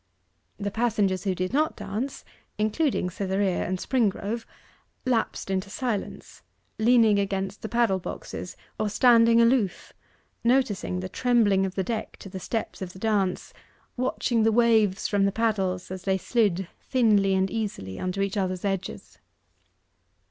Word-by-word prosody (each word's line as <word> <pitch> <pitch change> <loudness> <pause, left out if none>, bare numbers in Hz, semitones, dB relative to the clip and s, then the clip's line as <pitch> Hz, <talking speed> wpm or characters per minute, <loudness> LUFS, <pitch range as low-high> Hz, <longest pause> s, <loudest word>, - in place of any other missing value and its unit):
The 205 0 -3
passengers 205 -4 0
who 190 -2 +1
did 185 +5 -3
not 310 +3 +1
dance, 210 +6 -5 0.3
including 215 - 0
Cytherea 190 0 -1
and 185 +1 -1
Springrove, 225 0 -1 0.6
lapsed 230 -5 -1
into 190 +1 -1
silence, 230 -2 -4 0.4
leaning 225 -2 +5
against 195 0 -2
the 220 - -5
paddle 235 -5 +2
boxes, - - -7 0.2
or 215 - 0
standing 230 +1 +5
aloof 230 -5 +2 0.5
noticing 230 -7 +1
the 185 - -4
trembling 205 -3 +2
of 185 - -8
the 190 - 0
deck 225 +2 -4
to 195 - -10
the 190 - -6
steps 220 +2 -4
of 180 -1 -5
the - - -12
dance 200 -3 -1 0.4
watching 245 -2 0
the 225 +1 +4
waves 220 -4 +3
from 200 -1 +2
the 200 - +2
paddles 195 -5 -1
as 185 -1 -5
they 190 +1 +1
slid 195 -4 +1
thinly 210 -7 +2
and 190 0 +1
easily 200 - -4
under 185 +2 -1
each 200 +1 -2
other's 185 -1 -1
edges. 195 -2 -4
205 Hz, 145 wpm, -26 LUFS, 190-230 Hz, 0.6 s, leaning